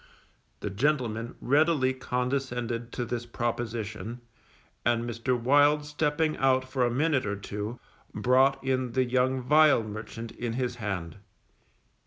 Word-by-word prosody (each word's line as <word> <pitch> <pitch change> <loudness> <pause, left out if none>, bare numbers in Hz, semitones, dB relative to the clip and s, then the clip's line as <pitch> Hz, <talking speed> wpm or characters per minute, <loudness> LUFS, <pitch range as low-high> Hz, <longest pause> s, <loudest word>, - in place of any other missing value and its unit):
_ - - -27 0.6
The 105 - -3
gentleman 120 -1 0
readily 145 -1 +3
condescended 125 -2 -2
to 120 - -2
this 120 0 -4
proposition, 115 -1 -4 0.6
and 120 0 +1
Mr. 120 +1 -1
Wild 145 +4 +4
stepping 150 +1 0
out 130 -1 +2
for 130 -1 0
a 120 - +3
minute 135 -1 +1
or 100 - -1
two, 105 +3 -5 0.3
brought 135 +2 +3
in 130 -2 -1
the 130 -1 +2
young 130 +1 +1
vial 150 -2 +5
merchant 110 +2 -7
in 120 -2 -4
his 125 0 -2
hand. 95 -7 -4
125 Hz, 135 wpm, -28 LUFS, 115-135 Hz, 0.6 s, vial